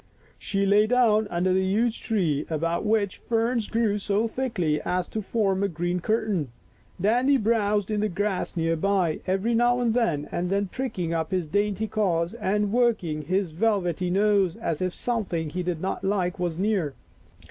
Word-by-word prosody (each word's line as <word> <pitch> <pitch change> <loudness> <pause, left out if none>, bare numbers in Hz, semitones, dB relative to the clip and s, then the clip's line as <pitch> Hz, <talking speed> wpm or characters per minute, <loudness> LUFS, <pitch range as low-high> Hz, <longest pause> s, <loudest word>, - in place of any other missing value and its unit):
She 200 0 -1
lay 205 +2 +4
down 220 -3 +3
under 180 +2 +1
the 190 0 +2
huge 220 +5 0
tree 170 - 0
about 165 +2 -1
which 210 -3 +1
ferns 230 0 0
grew 225 -3 0
so 205 +3 0
thickly 195 - -1
as 180 0 -1
to 220 - -3
form 195 -2 0
a 200 - +2
green 175 0 -2
curtain. 210 - 0 0.5
Dandy 245 +8 +3
browsed 210 -3 +1
in 210 - 0
the 215 +1 0
grass 195 -1 -2
near 165 0 +1
by, 180 -2 +1
every 195 +5 +1
now 240 +1 +3
and 235 -2 +1
then 185 -1 0
pricking 185 -11 -3
up 160 -1 -1
his 185 -3 -1
dainty 205 +5 0
ears 175 -4 +1
and 210 -2 -1
work 235 -4 +2
ing 155 -2 -3
his 185 +3 -1
velvety 180 -2 0
nose 195 -2 +2
as 165 -1 -3
if 185 -1 -1
something 185 -10 -2
he 180 - -2
did 175 -2 -2
not 190 - -3
like 190 -2 0
was 175 -2 -2
near. 190 -7 0
195 Hz, 170 wpm, -25 LUFS, 175-220 Hz, 0.5 s, lay